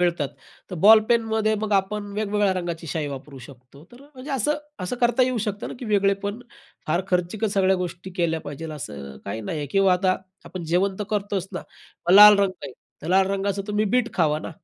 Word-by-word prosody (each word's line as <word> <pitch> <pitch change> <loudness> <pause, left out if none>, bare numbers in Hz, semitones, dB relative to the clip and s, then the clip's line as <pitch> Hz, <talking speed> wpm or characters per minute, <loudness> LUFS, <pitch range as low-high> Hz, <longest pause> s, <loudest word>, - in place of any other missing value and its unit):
मिळतात. 170 -5 +1 0.4
तर - - -4
बॉलपेनमध्ये 220 0 +4
मग 215 -1 -2
आपण 200 +2 0
वेगवेगळ्या 205 -1 0
रंगाची 175 -2 -4
शाई 155 0 -2
वापरू 140 0 -8
शकतो. 130 +3 -15
तर 245 - -15
म्हणजे 280 0 -11
असं, 275 +3 0 0.3
असं 185 +7 -3
करता 240 +1 +3
येऊ 255 -1 -1
शकतं 210 0 -3
ना - - -7
की 250 - -7
वेगळेपण. 200 +1 0 0.5
फार 170 +4 0
खर्चीक 180 +4 -1
सगळ्या 195 -2 +2
गोष्टी 180 +1 -5
केल्या 165 -3 0
पाहिजे, 145 +2 -7
असं 70 - -8
काही 100 +3 -4
नाही 130 +9 -4
आहे. 145 - -4
किंवा 195 +1 +3
आता 185 0 +2 0.3
आपण 175 0 -7
जेवण 190 +2 +1
तर - - -1
करतोच 200 -2 -2
ना, 180 - -3 0.5
मग 180 - +6
लाल 210 0 +10
रंग 195 -2 +1
आहे 125 +4 -10
लाल 190 +1 +4
रंगाचं 200 0 -1
तुम्ही 210 +1 +1
बीट 250 - 0
खावा 155 -3 +2
ना. - - -7
195 Hz, 195 wpm, -23 LUFS, 165-210 Hz, 0.5 s, लाल